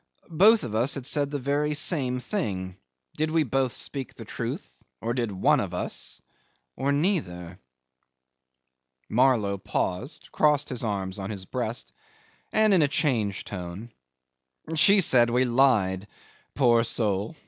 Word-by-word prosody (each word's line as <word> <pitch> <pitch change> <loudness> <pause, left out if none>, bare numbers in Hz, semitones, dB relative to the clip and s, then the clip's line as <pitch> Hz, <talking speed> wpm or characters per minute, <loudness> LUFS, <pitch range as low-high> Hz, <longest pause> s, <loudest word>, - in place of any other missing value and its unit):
Both 210 +7 +5
of 110 - -5
us 120 +5 +1
had 135 -3 -6
said 145 0 +1
the 145 - -3
very 145 +2 0
same 135 -5 0
thing. 100 - -3 0.4
Did 155 +1 0
we 160 0 +2
both 135 -1 0
speak 135 +1 -5
the - - -9
truth - - -6 0.2
or 115 +1 -2
one 110 -6 +1
of - - -3
us - - -4 0.6
did 130 - -8
or 140 - +2
neither?.. 95 - -1 0.8
.' 65 0 -52
Marlow 110 -5 +2
paused, 115 - -3
crossed 150 -1 +2
his 125 -3 -3
arms 100 -3 -3
on 95 0 -5
his 100 -3 -6
breast, 120 +1 -4 0.6
and 215 -1 +4
in 180 - +5
a 150 - +4
changed 115 - 0
tone 95 +4 -7 0.8
'She 195 +5 +6
said 120 -8 +4
we 125 +2 +2
lied. 110 -7 +2 0.5
Poor 120 -4 +4
soul! 105 0 -1
120 Hz, 145 wpm, -26 LUFS, 100-145 Hz, 0.8 s, She